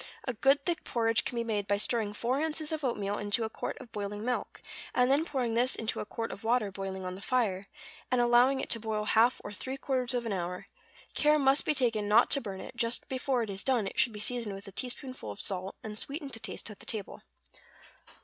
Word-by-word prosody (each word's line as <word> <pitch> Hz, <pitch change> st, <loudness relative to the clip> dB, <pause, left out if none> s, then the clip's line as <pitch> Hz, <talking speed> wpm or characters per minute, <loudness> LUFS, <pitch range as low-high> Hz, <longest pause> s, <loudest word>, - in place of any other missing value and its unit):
A 255 Hz, -, 0 dB
good 275 Hz, +4 st, +4 dB
thick 345 Hz, +1 st, 0 dB
porridge 225 Hz, -2 st, +2 dB
can -, -, -2 dB
be 235 Hz, -, 0 dB
made 210 Hz, -3 st, -1 dB
by 205 Hz, -, +2 dB
stirring 210 Hz, 0 st, 0 dB
four 250 Hz, +6 st, 0 dB
ounces 315 Hz, -1 st, -1 dB
of 310 Hz, -1 st, -2 dB
oatmeal 205 Hz, -5 st, -1 dB
into 205 Hz, +2 st, +1 dB
a 220 Hz, -, -3 dB
quart -, -, -4 dB
of 250 Hz, -4 st, -11 dB
boiling 205 Hz, 0 st, -4 dB
milk, 250 Hz, 0 st, -2 dB, 0.4 s
and 250 Hz, +1 st, +4 dB
then 290 Hz, +4 st, +3 dB
pouring 255 Hz, -8 st, -1 dB
this 245 Hz, +3 st, +3 dB
into 225 Hz, 0 st, -2 dB
a -, -, -4 dB
quart 230 Hz, 0 st, -4 dB
of 200 Hz, -, -8 dB
water 225 Hz, -3 st, +2 dB
boiling 190 Hz, -1 st, -5 dB
on 180 Hz, -, -3 dB
the 190 Hz, -, -9 dB
fire, 205 Hz, -6 st, +1 dB, 0.4 s
and 250 Hz, -, +2 dB
allowing 240 Hz, +3 st, +5 dB
it -, -, -2 dB
to 230 Hz, -, +4 dB
boil 215 Hz, -1 st, -2 dB
half 230 Hz, +3 st, +4 dB
or 205 Hz, -, -6 dB
three 260 Hz, +7 st, -4 dB
quarters 260 Hz, -2 st, -1 dB
of 240 Hz, -1 st, -1 dB
an 225 Hz, -, -1 dB
hour; 180 Hz, -1 st, -3 dB, 0.5 s
care 300 Hz, 0 st, +4 dB
must 275 Hz, 0 st, +4 dB
be 305 Hz, -, +2 dB
taken 230 Hz, -6 st, +1 dB
not 220 Hz, +4 st, +5 dB
to 280 Hz, -, +5 dB
burn 195 Hz, -4 st, -6 dB
it; -, -, -9 dB
just 235 Hz, 0 st, 0 dB
before 260 Hz, -1 st, 0 dB
it 220 Hz, -, -5 dB
is 195 Hz, +1 st, -2 dB
done 250 Hz, -6 st, +2 dB
it 195 Hz, -, -4 dB
should 240 Hz, -, +4 dB
be 210 Hz, -, -8 dB
seasoned 230 Hz, -2 st, -1 dB
with 195 Hz, +1 st, -8 dB
a -, -, -8 dB
teaspoonful 255 Hz, -, -4 dB
of 100 Hz, -, -7 dB
salt; 190 Hz, 0 st, -2 dB
and 215 Hz, -1 st, -3 dB
sweetened 280 Hz, -1 st, -4 dB
to 225 Hz, -, -4 dB
taste 225 Hz, -, -5 dB
at 205 Hz, -, -12 dB
the -, -, -11 dB
table. 210 Hz, -3 st, -3 dB
230 Hz, 240 wpm, -31 LUFS, 205-255 Hz, 0.5 s, allowing